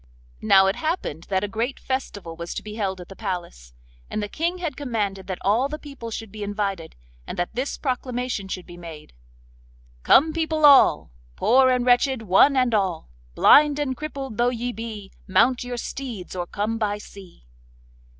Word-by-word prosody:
Now 190 0 +6
it 195 +1 +1
happened 310 - -3
that 190 0 0
a - - 0
great 230 +6 -3
festival 205 -10 -4
was 170 +1 -6
to - - -5
be 210 - -8
held 195 -4 -2
at 175 - -9
the 195 - -11
palace, 175 - -6 0.3
and - - -3
the - - -3
King 340 - -2
had 335 -6 -4
commanded 210 -8 -3
that 185 -2 -3
all 235 +7 +2
the 305 - -4
people 275 -6 -9
should 225 -2 -6
be 215 0 -9
invited, 200 -5 -3 0.3
and - - -6
that 175 - -2
this 255 +5 -3
proclamation 250 -5 -3
should 185 -1 -5
be 175 -1 -12
made: 165 - -11 0.9
'Come, 310 - +5
people 315 -1 +1
all! 280 - +6 0.2
Poor 260 - +4
and 250 -1 +1
wretched, 250 0 +3
one 220 +8 +5
and 255 -2 +2
all! 185 - -1 0.2
Blind 295 -1 +6
and 280 -3 -1
crippled 275 -4 -6
though 240 +1 +3
ye 245 0 -3
be, 215 -3 -7 0.2
Mount 250 +6 +3
your 245 0 -5
steeds 235 -7 -6
or 175 -1 -3
come 215 +4 -2
by 205 -2 0
sea. 195 - -14
225 Hz, 180 wpm, -24 LUFS, 190-260 Hz, 0.9 s, Now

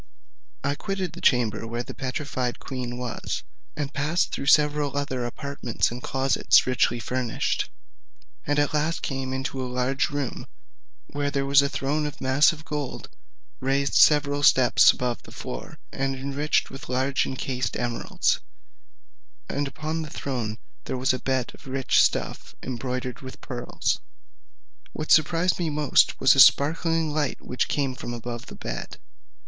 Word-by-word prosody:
I 140 +1 +1
quitted 190 +4 -3
the - - -9
chamber 115 -3 +2
where 120 +1 -3
the - - -8
petrified 130 -2 -3
queen 125 -2 -5
was, 125 -2 -4 0.3
and 145 -1 -3
passed 155 +5 0
through 140 - -4
several 150 -1 +3
other 130 -4 -2
apartments 140 -3 -2
and 120 +1 -6
closets 135 0 +3
richly 125 -1 +1
furnished, 125 -1 -1 0.8
and 145 +1 +1
at 145 0 +2
last 155 +2 0
came 135 -1 -3
into 130 0 -3
a 130 - -3
large 125 +2 0
room, 145 -3 -4 0.6
where 145 0 -2
there 140 -1 -1
was 140 0 +6
a 140 - 0
throne 150 +2 -1
of 150 0 -8
massive 150 +4 +3
gold, 145 -4 -4 0.5
raised 135 +1 0
several 145 -1 +5
steps 130 -3 +6
above 125 -1 -3
the - - -14
floor, 60 - -7
and 135 0 -1
enriched 140 +3 0
with 135 - -9
large 130 +2 +1
enchased 130 -1 -3
emeralds, 120 -1 0 1.1
and 145 0 -2
upon 155 +4 -3
the 155 - -6
throne 120 -8 -3 0.3
there - - -3
was 130 +1 +2
a 130 - -2
bed 130 -2 -1
of - - -16
rich 135 -2 +3
stuff - - -1
embroidered 125 0 -4
with 130 -1 -9
pearls. 120 -3 -2 0.9
What 155 - -4
surprised 165 +3 +4
me 170 -2 0
most 150 -2 +3
was - - +6
a - - +1
sparkling 165 +2 +5
light 150 -3 -1
which 125 - -2
came 140 -3 0
from 120 -1 -6
above 120 0 -6
the - - -9
bed. - - -6
135 Hz, 155 wpm, -25 LUFS, 125-145 Hz, 1.1 s, was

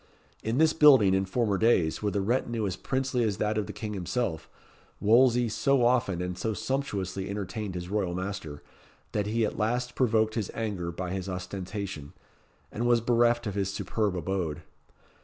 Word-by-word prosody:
In 115 +3 -1
this 160 +1 +4
building, 135 -11 +6
in 95 0 +2
former 100 -1 0
days, 95 -9 +2
with 105 -1 -1
a 100 - +2
retinue 115 +1 0
as 95 -2 -2
princely 130 -1 -1
as 105 -4 0
that 105 0 0
of 105 -1 -1
the - - -5
King 105 +1 -5
himself, 90 -2 -2 0.5
Wolsey 120 +2 +4
so 130 +3 +2
often 120 -8 +2
and 90 0 -3
so 110 +4 -2
sumptuously 105 -6 -3
entertained 100 0 -4
his 90 0 -5
royal 95 -3 -1
master, 90 -6 -5 0.5
that 105 -1 -1
he 115 +1 +1
at 105 - -4
last 120 +3 0
provoked 110 -4 +2
his 110 -4 -2
anger 100 -7 -3
by 90 +1 -5
his 95 0 -3
ostentation, 90 -3 -5 0.6
and 120 +2 -1
was 120 -1 +4
bereft 120 0 +2
of 105 - -2
his 100 -1 -1
superb 100 0 -1
abode. 85 -3 -2
105 Hz, 175 wpm, -28 LUFS, 95-120 Hz, 0.6 s, building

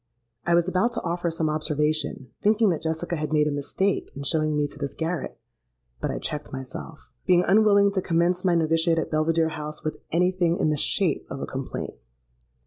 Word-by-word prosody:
"I 170 - +4
was 170 0 +3
about 185 +6 +1
to - - -3
offer 175 0 -1
some 160 -1 -1
observation, 150 -4 -1
thinking 215 -1 +4
that 160 - -2
Jessica 160 +2 -2
had 155 0 -3
made 150 -1 +3
a - - 0
mistake 160 +7 -1
in 140 - -6
showing 155 +1 +1
me 145 - +2
to 145 0 -12
this 140 -2 -4
garret; 165 +1 -3 0.6
but - - -2
I - - -2
checked 150 0 -4
myself—being 130 - -2
unwilling 200 0 +5
to 195 -1 0
commence 175 +1 +1
my 180 -2 +3
noviciate 165 +1 +2
at 160 - -1
Belvidere 160 +1 +2
House 150 -1 -6
with 155 - -3
any 180 +3 +3
thing 175 -2 +1
in 155 -6 +2
the - - +1
shape 165 +3 0
of - - -5
a - - -3
complaint. 130 - -5
165 Hz, 195 wpm, -25 LUFS, 150-180 Hz, 0.6 s, unwilling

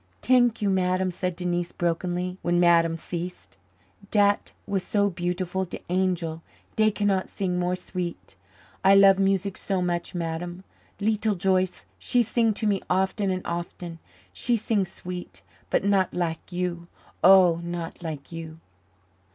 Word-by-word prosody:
"T'ank 245 -3 +3
you, 200 - +2
Madame," 185 0 +1
said 180 0 -3
Denise 175 -1 -2
brokenly, 180 +2 -2
when 175 0 +1
Madame 170 -1 +4
ceased. 175 +2 -6 0.5
"Dat 205 -1 +2
was 195 -2 -1
so 200 +1 +1
beautiful 180 +1 -2
de 180 - -7
angel, 175 -3 0 0.3
dey 215 0 +4
cannot 205 -2 0
sing 180 -2 -2
more 180 0 0
sweet. 180 - -6 0.5
I 195 +1 +7
love 195 -1 +7
music 195 0 +1
so 195 -2 -1
much, 175 0 -2
Madame. 175 +2 -4 0.4
Leetle 215 0 +1
Joyce, 185 0 0
she 245 -1 +2
sing 230 0 +2
to 220 - -3
me 200 -2 +1
often 190 +2 +1
and 185 -1 -2
often 170 0 -5 0.3
she 235 - +1
sing 205 -3 0
sweet, 180 -1 -8 0.3
but - - +1
not 195 -2 +2
lak 170 0 -3
you 175 -1 -3 0.4
oh, 180 -3 +7
not 170 0 -5
lak 155 -4 -6
you." 165 -1 -7
180 Hz, 145 wpm, -26 LUFS, 175-195 Hz, 0.5 s, I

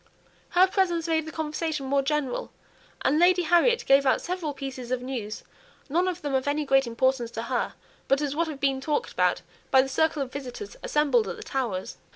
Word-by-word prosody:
Her 370 - +8
presence 355 -4 0
made 320 -1 0
the - - -5
conversation 310 -2 -3
more 275 +1 +2
general, 275 -2 -2 0.5
and 295 +3 +3
Lady 355 +1 +5
Harriet 350 +9 +3
gave 275 +1 +5
out 265 - +3
several 355 -4 -3
pieces 265 -3 -7
of 250 -1 -1
news, 235 -5 -5 0.5
none 350 +6 +2
of 360 -1 -3
them 290 -2 -2
of 265 +1 0
any 295 +1 0
great 270 -2 +3
importance 240 +1 +1
to 225 - -2
her, 245 +1 -2 0.3
but 275 - +3
as 290 -1 -2
what 335 +2 +1
had 300 -3 -6
been 270 -1 +1
talked 305 - -1
about - - +1 0.3
by 265 -2 +6
the - - -4
circle 315 +1 +1
of 255 - -10
visitors 280 - -7
assembled 275 -8 +2
at 180 - -4
the - - -8
Towers. 230 -9 -3
280 Hz, 200 wpm, -26 LUFS, 265-320 Hz, 0.5 s, Her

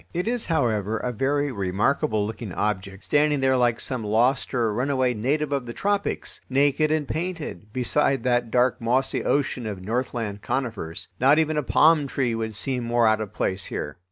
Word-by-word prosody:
It 180 +4 -1
is, 240 -1 0
however, 115 - 0
a 125 - -2
very 140 +4 0
remarkable 105 +2 0
looking 110 -1 -6
object, 100 -1 -2
standing 150 0 +2
there 130 0 +3
like 120 -2 +2
some 130 -4 -2
lost 120 +6 +1
or 115 -4 +1
runaway 130 +1 +1
native 140 +7 -1
of 135 -3 -1
the 120 - -5
tropics, 200 +4 -2
naked 145 +3 +2
and 155 -3 0
painted, 160 - -5
beside 135 +3 +1
that 120 -2 +1
dark 125 +2 +2
mossy 125 +4 0
ocean 135 -4 0
of 100 -3 -6
northland 115 -2 -2
conifers. 110 -10 -3
Not 135 +4 +5
even 155 -1 +2
a 150 - +1
palm 150 +1 +4
tree 130 -3 -1
would 110 -1 -3
seem 125 +2 -1
more 120 0 +2
out 110 0 +3
of 105 -3 -5
place 95 0 -2
here. 75 - -5
125 Hz, 180 wpm, -24 LUFS, 110-145 Hz, -, Not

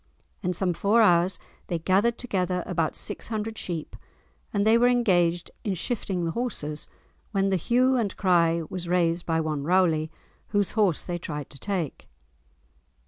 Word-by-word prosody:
In 180 - -1
some 180 0 0
four 205 +6 +2
hours 175 -1 +4 0.3
they 175 - -1
gathered 195 +8 +2
together 185 -6 -1
about 165 -4 -1
six - - -2
hundred 220 0 -3
sheep 170 -7 -5 0.6
and 200 -1 +1
they 220 +1 +6
were 240 +1 +5
engaged 180 -8 +2
in 200 -3 -1
"shifting" 190 -2 -2
the 165 - -1
horses, 155 -10 -3 0.5
when 195 -1 +2
the - - +3
hue 255 +8 +2
and 210 -5 -1
cry 170 -3 +3
was 180 0 -5
raised 170 -1 +1
by 165 -1 +1
one 155 -2 -2
Rowley, 165 -2 +2 0.4
whose 205 -2 0
horse 205 -7 +2
they 175 -1 -4
tried 150 -4 -6
to 140 - -12
take. 185 -6 -4
180 Hz, 160 wpm, -26 LUFS, 170-210 Hz, 0.6 s, they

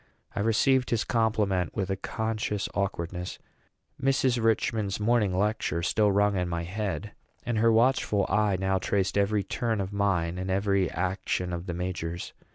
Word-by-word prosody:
I - - -2
received 125 +5 +3
his 115 -2 +1
compliment 105 -6 0
with 95 -2 -1
a - - +1
conscious 110 0 -2
awkwardness. 90 -2 -3 0.6
Mrs. 130 -3 +2
Richman's 110 -2 +1
morning 105 -2 +2
lecture 100 -5 0
still 105 +3 +3
rang 100 +1 +3
in 90 -1 -1
my 85 0 -2
head; 105 +3 -3 0.3
and 120 -2 0
her 115 +1 +5
watchful 115 -3 +3
eye 105 -2 +2
now 95 0 +1
traced 95 +1 0
every 100 0 +2
turn 115 0 -1
of 95 0 -3
mine 90 -4 0
and 95 +1 -3
every 100 -1 +1
action 90 0 -2
of 85 +2 -5
the 85 - -3
major's. 85 -1 -4
100 Hz, 160 wpm, -28 LUFS, 95-110 Hz, 0.6 s, her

